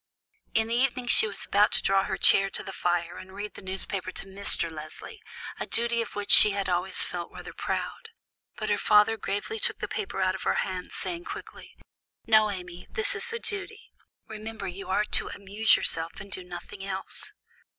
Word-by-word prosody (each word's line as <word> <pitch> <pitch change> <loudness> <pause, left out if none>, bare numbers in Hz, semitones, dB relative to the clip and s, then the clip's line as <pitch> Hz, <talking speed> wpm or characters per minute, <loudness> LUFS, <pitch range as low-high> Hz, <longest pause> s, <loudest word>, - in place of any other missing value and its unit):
In 220 0 +3
the - - -1
evening 250 0 +1
she 235 - +5
was 205 - -5
about 205 +1 +4
to - - +2
draw 195 0 +3
her 190 - -2
chair 195 +2 +5
to - - -6
the 195 - -7
fire 175 -1 -1
and 190 +1 -11
read 210 +1 -5
the - - -11
newspaper 190 0 -4
to - - -5
Mr. 195 -3 +1
Leslie, 155 - -9 0.4
a - - -3
duty 235 0 +1
of 230 - -6
which 205 0 -2
she 210 - +10
had 200 -1 -2
always 180 +1 +3
felt 175 -1 -4
rather - - -9
proud; 455 -1 -4 0.5
but - - -2
her - - +2
father 210 +1 +5
gravely 215 - -3
took - - +1
the - - -4
paper 405 - -4
out 185 -1 +2
of 190 - -6
her - - +1
hand, 185 -2 -5
saying 345 0 -4
quickly, - - -9 0.5
"No, 215 -1 +5
Amy, 180 -3 -7
this 435 -3 -1
is 475 - -5
a 465 - -2
duty; 440 0 -5 0.3
remember 220 -2 -6
you 190 +2 -7
are 210 +3 +2
to - - +4
amuse 205 +3 +3
yourself 165 +1 0
and 200 0 -10
do 185 - -5
nothing 180 +2 -9
else." 190 -1 -5
200 Hz, 200 wpm, -27 LUFS, 185-225 Hz, 0.5 s, she